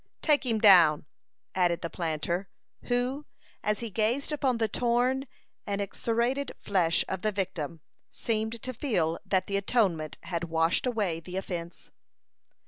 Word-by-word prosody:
"Take 290 -4 +3
him 225 -2 +2
down," 175 -9 +7 0.5
added 175 -2 +1
the 170 - -2
planter, 170 +2 -2 0.4
who, 255 +4 -1 0.3
as 210 +1 0
he 230 -2 -5
gazed 230 +9 0
upon 270 -5 +1
the 225 -1 +1
torn 245 +4 +1 0.4
and 200 0 -1
excoriated 235 +7 -1
flesh 175 -4 +1
of 190 -1 -3
the 215 - +1
victim, 170 -6 -3 0.3
seemed 220 0 -2
to 255 - -3
feel 180 - 0
that 190 -2 +2
the 200 - -1
atonement 190 - 0
had 170 -1 -3
washed 165 +7 +1
away 205 -9 0
the 180 +3 -7
offence. 175 -3 -6
200 Hz, 140 wpm, -28 LUFS, 170-240 Hz, 0.5 s, down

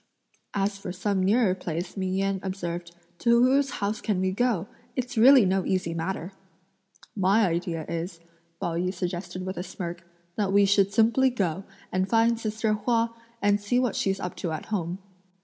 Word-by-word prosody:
"As 200 0 0
for 195 - -5
some 195 +1 -1
nearer 200 +1 +3
place," 175 -1 -5
Ming 190 -1 -1
Yen 195 0 0
observed; 175 -3 -5 0.2
"to 235 0 +4
whose 275 +2 +3
house 210 -3 -2
can 205 -4 0
we 185 0 +1
go? 205 -3 0 0.3
It's 255 +1 -3
really 250 +1 +7
no 190 0 +1
easy 180 -3 -1
matter!" 175 +2 -3 0.8
"My 200 +2 +3
idea 170 -2 -2
is," 170 +1 -4 0.4
Pao 170 - -2
yü 180 +1 0
suggested 185 0 -4
with 185 +1 -4
a 175 - -2
smirk, 175 -2 -6 0.3
"that 200 -3 +1
we 200 0 +5
should 200 0 +3
simply 230 +5 +4
go, 190 -6 -2 0.3
and 185 +1 0
find 230 0 +3
sister 220 0 -1
Hua, 230 +2 +1 0.3
and 205 0 +3
see 205 +4 0
what 250 -4 0
she's 195 -1 0
up 180 -2 -4
to 170 - -3
at 155 - -4
home." 175 -2 -1
195 Hz, 175 wpm, -26 LUFS, 180-220 Hz, 0.8 s, really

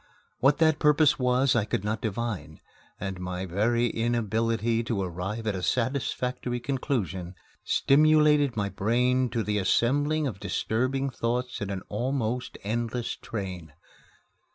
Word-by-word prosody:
What 135 +3 +4
that 160 -2 +3
purpose 150 -1 +4
was 125 +1 +3
I 115 - +3
could 100 -2 -2
not 110 +1 -2
divine, 105 -9 -4 0.4
and 95 -2 -4
my 90 0 -4
very 110 +7 +1
inability 115 0 0
to 115 -4 -1
arrive 95 +5 -4
at 105 - 0
a 95 - -4
satisfactory 125 +2 -1
conclusion 110 - -2 0.3
stimulated 150 -3 +4
my 100 -1 0
brain 125 +6 +1
to 115 -1 -1
the 105 0 0
assembling 145 +10 +2
of 110 -8 -4
disturbing 130 +7 -1
thoughts 120 0 -2
in 105 - -3
an 95 -2 -4
almost 125 +1 -2
endless 115 +3 -2
train. 90 -7 -6
115 Hz, 130 wpm, -27 LUFS, 100-130 Hz, 0.4 s, What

